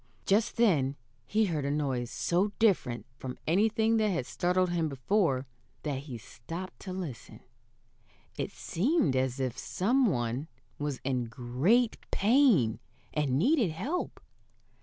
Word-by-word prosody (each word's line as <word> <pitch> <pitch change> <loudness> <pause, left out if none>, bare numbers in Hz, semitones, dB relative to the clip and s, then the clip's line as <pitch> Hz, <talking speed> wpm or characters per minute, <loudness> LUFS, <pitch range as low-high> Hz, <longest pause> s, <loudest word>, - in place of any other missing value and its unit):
Just 215 +5 +2
then 150 - +3 0.3
he 220 +1 +2
heard 160 -7 -1
a 140 - -1
noise 135 -5 -1
so 185 +4 0
different 175 - +2
from 130 -1 -6
anything 220 +5 +3
that 215 -1 +2
had 165 -10 -1
startled 180 +3 +1
him 165 -2 0
before 135 - +1 0.4
that 145 -3 -2
he 135 -3 -7
stopped 165 - -8
to 190 - -7
listen. 175 -11 -6 1.0
It - - -3
seemed 195 - +1
as 130 0 0
if 130 -2 -2
some 245 +7 +2
one 125 - -1 0.3
was 145 -2 -2
in 130 -2 0
great 130 - +1
pain, 205 - +4 0.3
and 145 -4 +1
needed 245 - +3
help. 275 - -3
165 Hz, 135 wpm, -30 LUFS, 130-210 Hz, 1.0 s, pain